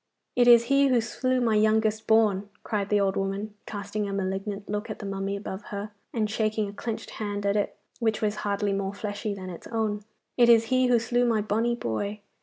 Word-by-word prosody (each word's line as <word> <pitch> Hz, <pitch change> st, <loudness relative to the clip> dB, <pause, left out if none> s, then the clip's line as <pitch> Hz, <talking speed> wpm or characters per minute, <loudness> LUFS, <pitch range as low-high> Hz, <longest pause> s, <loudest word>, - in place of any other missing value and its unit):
'It 245 Hz, -1 st, +4 dB
is 235 Hz, -1 st, +8 dB
he 275 Hz, +3 st, +4 dB
who 255 Hz, -3 st, +4 dB
slew 255 Hz, +3 st, 0 dB
my 235 Hz, -3 st, +2 dB
youngest 215 Hz, 0 st, +2 dB
born,' 210 Hz, -3 st, +3 dB
cried 205 Hz, -3 st, -2 dB
the 210 Hz, -, +3 dB
old 195 Hz, -1 st, +1 dB
woman, 195 Hz, +2 st, -2 dB
casting 205 Hz, 0 st, -3 dB
a -, -, -3 dB
malignant 195 Hz, +1 st, -3 dB
look 210 Hz, +1 st, -3 dB
at -, -, -4 dB
the 210 Hz, -, -8 dB
mummy 195 Hz, 0 st, -2 dB
above 200 Hz, 0 st, -6 dB
her, 205 Hz, +1 st, -5 dB, 0.2 s
and 220 Hz, -3 st, 0 dB
shaking 215 Hz, 0 st, 0 dB
a 200 Hz, -, -8 dB
clenched 225 Hz, +1 st, -5 dB
hand 205 Hz, -1 st, -4 dB
at 200 Hz, 0 st, +2 dB
it 205 Hz, -, -1 dB, 0.2 s
which 220 Hz, -3 st, +1 dB
was 210 Hz, -1 st, 0 dB
hardly 205 Hz, 0 st, -1 dB
more 195 Hz, 0 st, -2 dB
fleshy 205 Hz, 0 st, -3 dB
than 185 Hz, -1 st, -7 dB
its 170 Hz, -, -9 dB
own. 215 Hz, -2 st, -1 dB, 0.3 s
'It 240 Hz, -1 st, +6 dB
is 230 Hz, -1 st, +7 dB
he 255 Hz, 0 st, +4 dB
who 245 Hz, -1 st, +5 dB
slew 240 Hz, +2 st, +1 dB
my 230 Hz, -3 st, +2 dB
bonny 225 Hz, +3 st, +1 dB
boy. 205 Hz, -, -3 dB
210 Hz, 210 wpm, -27 LUFS, 200-225 Hz, 0.3 s, is